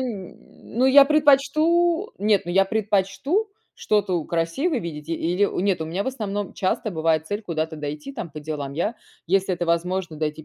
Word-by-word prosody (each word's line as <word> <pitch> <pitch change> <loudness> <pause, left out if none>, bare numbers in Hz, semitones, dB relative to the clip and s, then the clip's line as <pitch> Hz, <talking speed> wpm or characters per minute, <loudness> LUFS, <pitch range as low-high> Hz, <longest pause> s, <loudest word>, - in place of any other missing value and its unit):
ну 235 +1 -4
я 275 +1 +8
предпочту 310 +5 +3
Нет, 205 -1 +2
ну 175 - -4
я 195 +2 +5
предпочту 210 - 0 0.3
что-то 205 -3 0
у - - -7
красивое 170 - -1
видеть. 155 -4 -7
Или 175 +4 +1
нет, 190 -3 +1
у 160 - -1
меня 180 +5 -3
в - - -8
основном 205 -6 -3
часто 200 +3 -1
бывает 160 -1 +1
цель, 205 +5 -3
куда-то 160 -4 -3
дойти 150 - -6
там 170 - -6
по 150 - -8
делам. 145 -2 -5
Я, 170 +10 -1 0.3
если 190 +2 +2
это 175 -1 -2
возможно 170 0 -1
дойти 155 0 -3
190 Hz, 170 wpm, -23 LUFS, 165-235 Hz, 0.3 s, я